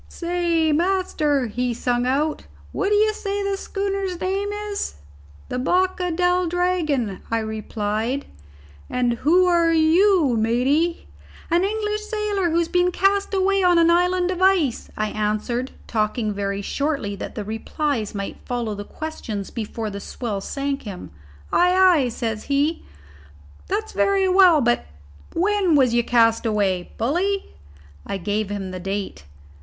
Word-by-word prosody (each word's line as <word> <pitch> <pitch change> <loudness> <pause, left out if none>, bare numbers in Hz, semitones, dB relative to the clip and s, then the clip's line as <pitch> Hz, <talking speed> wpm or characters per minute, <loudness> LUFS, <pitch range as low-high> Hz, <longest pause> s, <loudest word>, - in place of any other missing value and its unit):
"Say, 340 -2 0
master," 310 -5 +1
he 245 +2 -2
sung 245 +1 0
out, 295 +4 -1 0.2
"what 390 - -1
d'ye 420 +1 +4
say 405 -1 -3
the 395 0 0
schooner's 390 -2 -3
name 395 +2 -1
is?" 415 - -4 0.5
"The 250 - -2
Boca 360 +5 +1
del 360 +1 +1
Dragon," 325 - 0
I 230 - +1
replied. 220 +3 -2 0.6
"And 245 -1 +1
who 355 +6 +4
are 340 -2 +3
you, 325 - +4
matey?" 270 +10 +1 0.4
"An 345 +2 +3
English 420 +1 -1
sailor 420 -4 -1
who 330 - +1
has 340 -1 +2
been 360 0 +2
cast 395 +2 +1
away 390 +1 +2
on 355 -1 +4
an 335 0 +5
island 360 +1 +2
of 365 0 -4
ice," 370 -10 +2
I 215 0 0
answered, 215 +5 -2 0.2
talking 215 0 -1
very 200 0 -3
shortly 280 -6 -2
that - - -7
the 210 - -3
replies 225 +2 -3
might 200 -1 -4
follow 240 -3 -2
the 205 0 -6
questions 220 -8 -6
before 220 -1 -4
the 200 - -6
swell 205 -1 -4
sank 275 +4 -3
him. 185 - -8 0.4
"Ay, 360 +1 +4 0.3
ay," - - -1
says 225 -2 -4
he, 290 +3 0 0.8
"that's 430 +3 -2
very 390 -1 +2
well; 365 -4 +6
but 240 -1 +2 0.5
when 380 -2 +2
was 260 -4 +4
you 240 0 +3
cast 230 -1 +3
away, 195 -4 0
bully?" 360 - -1 0.5
I 200 - -4
gave 205 +2 -2
him 195 -2 -4
the 185 - -6
date. 195 - -4
305 Hz, 145 wpm, -22 LUFS, 225-365 Hz, 0.8 s, well